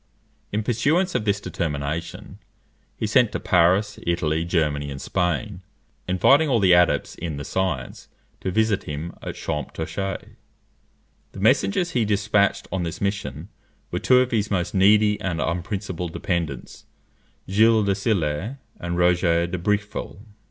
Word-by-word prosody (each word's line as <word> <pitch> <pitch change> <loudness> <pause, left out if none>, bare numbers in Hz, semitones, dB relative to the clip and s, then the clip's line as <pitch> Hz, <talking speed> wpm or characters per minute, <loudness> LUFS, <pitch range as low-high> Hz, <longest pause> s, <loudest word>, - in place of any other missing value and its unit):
In 105 +1 -1
pursuance 150 - +1
of 105 - -1
this 100 -1 +1
determination, 80 -1 -4 0.6
he - - -2
sent 115 +1 +3
to - - -2
Paris, 95 +4 +2
Italy, 80 -2 0
Germany, 75 -5 0
and 70 -1 -6
Spain, 90 +4 -2 0.5
inviting 135 - +4
all 120 -4 +3
the 95 -3 +5
adepts 90 0 +3
in 80 -4 -5
the 70 - -6
science 80 -10 -3 0.3
to - - -3
visit 110 +1 +1
him 75 +3 -5
at - - -6
Champtocé. 80 +6 -4 1.0
The - - -9
messengers 170 - +2
he 120 - +1
despatched 100 -1 +1
on 95 - -1
this 85 -1 -4
mission 100 -4 -3 0.4
were - - -1
two 125 - +4
of 130 - -1
his 110 -3 0
most 90 -3 -1
needy 105 +2 +4
and 85 -3 -2
unprincipled 90 0 -3
dependants, 80 -8 -4 0.6
Gilles 110 +3 +4
de 100 -1 +2
Sillé 95 - -1 0.2
and 85 0 -3
Roger 85 -1 +3
de 90 +1 -4
Bricqueville. 105 +3 -2
95 Hz, 140 wpm, -23 LUFS, 85-105 Hz, 1.0 s, the